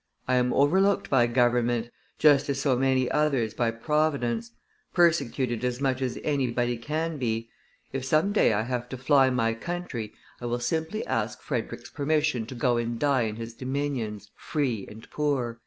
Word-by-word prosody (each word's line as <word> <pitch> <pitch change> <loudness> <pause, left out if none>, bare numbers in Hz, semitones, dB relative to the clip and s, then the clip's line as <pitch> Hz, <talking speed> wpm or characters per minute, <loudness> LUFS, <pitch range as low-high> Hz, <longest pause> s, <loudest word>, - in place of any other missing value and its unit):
I 130 - +1
am 125 0 +3
overlooked 190 +10 +3
by 120 -3 +5
government, 120 -1 +1 0.3
just 145 -1 +4
as 135 -1 0
so 135 -2 +2
many 130 0 +2
others 135 -8 +1
by 115 +1 +1
Providence; 120 -2 0 0.5
persecuted 135 -8 +2
as 125 0 -1
much 135 -2 0
as 125 -2 -2
anybody 125 -4 0
can 155 +6 -3
be, 115 -2 -2 0.4
if 135 -1 -2
some 155 +8 +2
day 205 - +4
I 110 0 +1
have 125 0 -3
to 130 - -5
fly 135 +1 +4
my 115 -3 +1
country, 130 -5 -5 0.3
I 120 - -3
will 120 +1 -1
simply 160 - -2
ask - - -2
Frederick's - - -4
permission 145 -5 0
to 130 - -7
go 120 0 +1
and 120 0 -2
die 135 -3 +2
in 105 - -6
his 115 0 -7
dominions, 130 -6 -3
free 125 -10 -2
and 110 +1 -12
poor." 130 -6 -1
130 Hz, 170 wpm, -27 LUFS, 120-145 Hz, 0.5 s, by